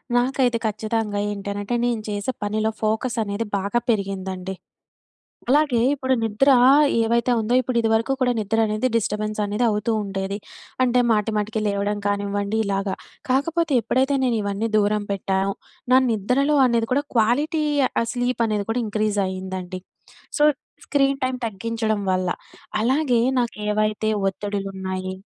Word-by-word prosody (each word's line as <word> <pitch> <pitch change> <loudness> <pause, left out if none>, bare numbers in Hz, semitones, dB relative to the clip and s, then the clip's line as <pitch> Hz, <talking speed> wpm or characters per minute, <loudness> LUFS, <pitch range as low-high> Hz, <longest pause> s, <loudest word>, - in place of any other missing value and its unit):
నాకైతే 245 -1 +2
ఖచ్చితంగా 215 -1 -1
ఏంటనంటే 200 +2 -3
నేను 235 -3 0
చేసే 205 +5 -2
పనిలో 215 +1 0
ఫోకస్ 220 +3 0
అనేది 200 +2 -3
బాగా 200 +5 0
పెరిగిందండి. 190 -3 -2 1.0
అలాగే 285 -3 +3
ఇప్పుడు 260 -2 0
నిద్ర 225 +5 +2 0.5
ఏవైతే 235 +2 +2
ఉందో 230 +3 0
ఇప్పుడు 255 -1 -3
ఇదివరకు 225 +3 +1
కూడా 250 -1 +3
నిద్ర 215 +1 -1
అనేది 215 +4 -1
డిస్టర్బెన్స్ 215 -1 -1
అనేది 210 +4 -1
అవుతూ 210 +1 0
ఉండేది. 195 0 -3 0.4
అంటే 250 -1 +3
మాటి 215 0 +1
మాటికి 215 +1 -1
లేవడం 205 0 -1
కానివ్వండి 205 +1 -1
ఇలాగ. 195 0 -1 0.4
కాకపోతే 325 +4 +1
ఎప్పుడైతే 265 +5 +1
నేను 245 -2 +1
ఇవన్నీ 200 +3 -2
దూరం 210 0 +2
పెట్టానో, 195 0 0 0.4
నా 260 - +8
నిద్రలో 250 +8 +1
అనేది 230 -2 +1
కూడా 285 +3 +1
క్వాలిటీ 290 +8 +2 0.4
ఆహ్, 230 - -1
స్లీప్ 245 -1 0
అనేది 210 -2 -1
కూడా 245 - 0
ఇంక్రీజ్ 210 -1 0
అయిందండి. 185 -1 -5 0.6
సో - - +2 0.4
స్క్రీన్ 275 -1 +1
టైమ్ 255 0 -1
తగ్గించడం 220 0 -2
వల్ల. 185 0 0 0.5
అలాగే 250 0 +2 0.2
నాకెవైతే 215 -1 -1 0.2
ఒత్తడిలున్నాయి 190 -1 -4
215 Hz, 130 wpm, -23 LUFS, 200-245 Hz, 1.0 s, నా